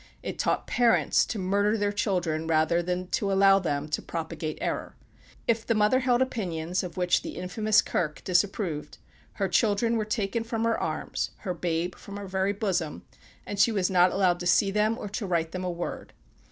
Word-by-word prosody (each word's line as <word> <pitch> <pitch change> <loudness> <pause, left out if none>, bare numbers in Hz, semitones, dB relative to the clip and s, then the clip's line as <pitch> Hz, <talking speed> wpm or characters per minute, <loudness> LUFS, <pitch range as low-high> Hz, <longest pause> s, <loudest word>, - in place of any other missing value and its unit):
It - - -5
taught - - 0
parents 240 -2 +3
to 225 - -3
murder 200 +3 +1
their 205 -1 0
children 180 -7 -1
rather 160 +1 +2
than 180 +1 -2
to 195 +2 0
allow 195 0 +5
them 145 -5 -2
to 150 - -1
propagate 160 -1 -5
error. - - -3 0.5
If 230 -1 +2
the 230 - 0
mother 215 +4 +3
held 255 -1 +3
opinions 180 -8 -2
of 180 -2 -7
which 180 -1 +2
the - - -7
infamous 215 +4 +2
"Kirk" 155 -3 -2
disapproved, 180 -4 -1 0.4
her 195 -2 -1
children 225 +4 +2
were 215 - -1
taken 215 +1 -1
from 225 -1 -3
her 230 0 +2
arms, - - -2
her 185 - -2
babe 175 0 -2
from 200 0 -10
her 205 - -6
very 190 +1 0
bosom, 190 -7 -2 0.4
and 205 - -5
she 215 +3 +5
was 195 -3 0
not 180 0 +5
allowed 185 -3 +2
to 175 - -3
see 195 +3 +4
them, 215 +2 +1
or 210 - -6
to 205 0 -4
write 165 -2 0
them 185 0 -4
a 180 - -1
word. 175 0 -5
195 Hz, 195 wpm, -27 LUFS, 175-215 Hz, 0.5 s, allow